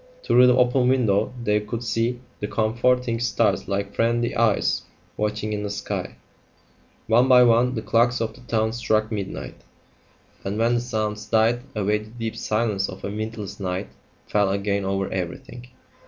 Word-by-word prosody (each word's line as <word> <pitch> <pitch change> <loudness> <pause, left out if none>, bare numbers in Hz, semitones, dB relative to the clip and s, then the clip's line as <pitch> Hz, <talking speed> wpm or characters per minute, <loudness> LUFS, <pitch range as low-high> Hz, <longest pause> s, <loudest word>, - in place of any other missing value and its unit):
Through 125 +1 +5
the 125 0 +4
open 125 0 +3
window 120 -6 +2
they 105 -1 +2
could 110 +3 -5
see 120 +2 -1 0.2
the 105 - -3
comforting 120 +2 +1
stars 120 - +1
like 100 0 -2
friendly 120 +1 +1
eyes 115 -3 +2 0.3
watching 105 0 -2
in 105 - -2
the 105 - -3
sky. 100 - -4 0.9
One 120 +3 +4
by 125 -1 +7
one 120 +2 +3
the 110 - -3
clocks 120 +3 +2
of 115 -1 -2
the 125 - -16
town 110 -2 0
struck 110 -2 0
midnight, 100 -3 -5 0.8
and 100 +2 -3
when 115 +2 +2
the 120 - +1
sounds 110 -3 -3
died 115 +2 +2
away 105 0 +1
the 105 0 -12
deep 115 -1 -5
silence 105 -3 -1
of 95 +1 -9
a 100 - -3
windless 105 -1 -5
night 95 0 -3 0.4
fell 100 -2 +1
again 100 0 -1
over 95 0 -1
everything. 95 +7 -6
110 Hz, 165 wpm, -23 LUFS, 105-120 Hz, 0.9 s, by